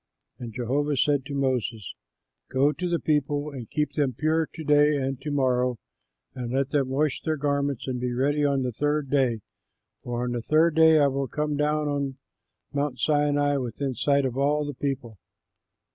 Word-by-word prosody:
And 120 -2 -6
Jehovah 135 +5 -1
said 140 0 +2
to 140 - -5
Moses, 125 -6 -1 0.6
"Go 135 +3 +3
to 180 +3 -3
the 170 - +1
people 150 -1 0
and 125 -5 -8
keep 150 -1 -1
them 140 -4 0
pure 155 +5 +1
to 160 - -8
day 150 0 +4
and 135 -1 -3
to 150 - -4
morrow, 125 -3 +1 0.6
and 125 -2 -5
let 135 +1 0
them 140 -3 +1
wash 140 +1 0
their 155 -1 -1
garments 140 -2 -1
and 125 -1 -2
be 125 0 -2
ready 145 +4 +1
on 140 -2 +2
the 125 - -1
third 145 +3 -1
day, 130 -6 +2 0.6
for 120 0 -3
on 125 - -2
the 120 -1 -2
third 155 +6 +3
day 160 0 +6
I 145 - +5
will 135 0 0
come 150 +2 -2
down 150 +1 0
on 140 -2 -2 0.6
Mount 140 -2 -1
Sinai 145 +1 +2
within 130 +1 -3
sight 140 +3 +2
of 130 0 -2
all 145 +2 +2
the 145 - -4
people." 125 -6 -4
140 Hz, 185 wpm, -26 LUFS, 130-150 Hz, 0.6 s, day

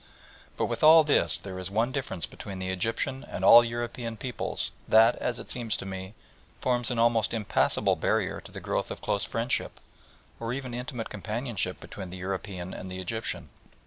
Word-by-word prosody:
But - - +1
with - - -3
all 160 +1 +9
this 150 -1 +3
there 95 -2 -7
is 95 0 -3
one 115 +5 +1
difference 110 - -3
between 100 -2 -8
the 95 0 -2
Egyptian 115 +8 -2
and - - -4
all 120 +1 +10
European 120 0 -4
peoples 125 +2 -3 0.2
that, 115 +2 +6
as 120 -1 -2
it - - -9
seems 115 -3 -1
to - - -6
me, 95 +1 -6 0.4
forms 125 -2 +1
an 120 - -2
almost 115 -1 +3
impassible 105 -3 +2
barrier - - 0
to - - -13
the - - -7
growth - - -2
of - - -6
close 100 - +1
friendship, 115 +2 -2 0.6
or 115 +1 -2
even 130 -2 -5
intimate 120 -1 -5
companionship, 105 -2 -3
between 95 -3 -8
the 95 - -7
European 95 -1 -4
and 95 - -7
the 95 0 -6
Egyptian. 110 +5 -3
115 Hz, 180 wpm, -28 LUFS, 95-120 Hz, 0.6 s, all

